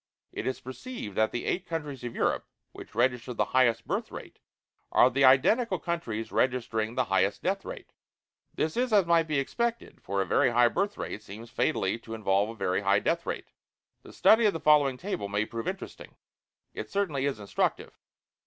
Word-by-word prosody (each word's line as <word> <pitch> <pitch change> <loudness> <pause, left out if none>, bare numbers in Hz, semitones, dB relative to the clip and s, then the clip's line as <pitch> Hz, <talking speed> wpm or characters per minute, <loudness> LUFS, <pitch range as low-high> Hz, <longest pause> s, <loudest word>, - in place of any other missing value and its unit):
It - - -5
is 130 - -2
perceived 130 - -7
that 110 0 +3
THE 120 - -4
EIGHT 180 0 -2
COUNTRIES 150 -6 -5
OF 120 -1 -5
EUROPE - - 0 0.2
WHICH - - -12
REGISTER 125 +1 0
THE - - +1
HIGHEST 120 -3 +2
BIRTH - - -2
RATE - - -10 0.5
ARE 125 - +5
THE 135 +3 +1
IDENTICAL 185 - +4
COUNTRIES 140 -13 -4
REGISTERING 115 -3 0
THE 130 - +2
HIGHEST 95 -2 +1
DEATH - - 0
RATE. - - -9 0.6
This 155 0 -1
is 250 0 0
as 205 -4 +5
might 170 -1 +3
be 150 -2 0
expected, 235 - -2
for 100 +1 -2
a 95 - +1
very 90 - +3
high 120 0 +4
birth 200 - -1
rate 110 - -5
seems 110 +3 -11
fatally 115 -8 0
to 115 -1 -8
involve 100 -1 +1
a 115 - -7
very 95 -2 -1
high 100 0 +3
death 170 +10 -1
rate. - - -5 0.5
The - - -14
study 220 0 +5
of 205 - +1
the 165 - -4
following 145 -4 +4
table 125 - -4
may 105 +1 0
prove 115 +1 -6
interesting 190 +1 -7 0.6
it - - -6
certainly 150 -9 0
is 135 -6 -3
instructive. 100 -1 -2
130 Hz, 190 wpm, -28 LUFS, 110-170 Hz, 0.6 s, ARE